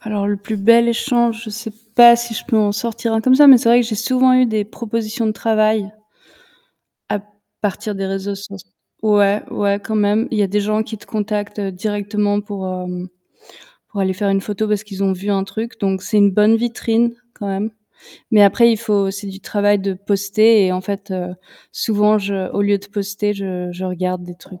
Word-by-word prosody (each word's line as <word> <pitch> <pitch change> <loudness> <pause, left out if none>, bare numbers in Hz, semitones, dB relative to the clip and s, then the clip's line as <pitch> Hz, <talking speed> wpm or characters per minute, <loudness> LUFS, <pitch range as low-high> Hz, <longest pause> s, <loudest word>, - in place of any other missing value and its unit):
alors, 210 -2 -2
le 205 0 0
plus 205 +2 -5
bel 230 +4 +4
échange, 235 -1 0
je 220 - -7
sais 220 +1 -7 0.2
pas 240 0 +9
si 240 -1 -5
je - - -5
peux 235 - 0
en 210 -1 +2
sortir 230 +2 -3
un 225 - +1
comme 255 +3 +4
ça, 290 +2 +7
mais 270 -3 +10
c'est 230 - 0
vrai 240 +1 +6
que 240 - -1
j'ai 225 - -3
souvent 255 +4 +2
eu 255 0 +4
des 215 -2 -1
propositions 225 +1 -4
de 215 - +1
travail 215 -1 0 1.2
à 210 - -2 0.4
partir 205 +1 -3
des 195 0 -3
réseaux 195 +1 -3
soc 200 0 -9 0.4
ouais 205 -1 +3
ouais 200 0 0
quand 220 +2 -3
même, 210 +2 +1
il 225 - -2
y - - +3
a - - +2
des 205 +2 0
gens 215 +1 0
qui 220 0 -8
te - - -17
contactent 210 -1 -3
directement 205 +1 -2
pour, 200 -2 -6
hem, 180 0 -5 0.8
pour 205 - -5
aller 190 -1 +1
faire 200 +2 -2
une 195 0 +1
photo 210 +2 -3
parce 210 0 -1
qu'ils 200 -2 -6
ont 190 - +2
vu 190 +2 -4
un 195 -1 +1
truc, 225 +4 -6
donc 195 -1 0
c'est 215 - -2
une 200 -1 +5
bonne 210 +3 +4
vitrine 235 0 0 0.2
quand 205 - -6
même. 195 +3 -2 0.6
Mais 215 -3 +6
après, 235 +4 +5
il 225 - -1
faut, 205 -3 0
c'est 200 +1 -7
du 195 0 -8
travail 205 +1 +1
de 195 0 -2
poster 205 +2 +3
et 185 - 0
en 185 - -2
fait, 200 +1 -6
heu, 180 -1 -4 0.4
souvent, 210 0 +2
je 195 -2 -3
au 200 - 0
lieu 205 0 +2
de 200 - -15
poster, 205 0 -3
je 185 -3 -5
je 180 +2 -6
regarde 180 0 -3
des 175 0 -10
trucs 180 +1 -15
205 Hz, 215 wpm, -18 LUFS, 195-220 Hz, 1.2 s, mais